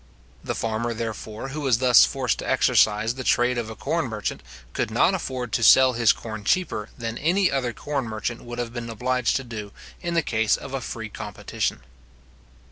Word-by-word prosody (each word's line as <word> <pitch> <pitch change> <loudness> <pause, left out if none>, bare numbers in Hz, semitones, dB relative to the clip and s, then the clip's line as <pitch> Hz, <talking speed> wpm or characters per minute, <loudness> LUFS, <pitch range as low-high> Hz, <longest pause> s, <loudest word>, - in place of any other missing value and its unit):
The - - -3
farmer, 115 +1 -2
therefore, 110 +2 -5
who 150 +3 -5
was 130 -5 +3
thus 125 -1 +7
forced 130 -4 -1
to - - -4
exercise 110 +2 +3
the 130 0 -6
trade 125 0 +2
of 115 -2 -4
a 110 - -7
corn - - -1
merchant, - - -4 0.3
could - - -1
not - - +3
afford 125 -3 -3
to - - +1
sell 130 +3 +7
his 115 -2 +4
corn 110 -2 -6
cheaper 110 - 0
than 115 0 -4
any 185 +5 +2
other 130 -3 0
corn 140 +3 -3
merchant 110 +1 -4
would 120 0 -7
have 120 -1 -4
been 120 -1 -5
obliged 125 +2 0
to 135 - -1
do 110 -4 -7 0.3
in 170 -1 -2
the 165 - +3
case 110 -3 +1
of 135 - -9
a 135 - -2
free 110 -2 -6
competition. - - -4
120 Hz, 195 wpm, -24 LUFS, 110-130 Hz, 0.3 s, thus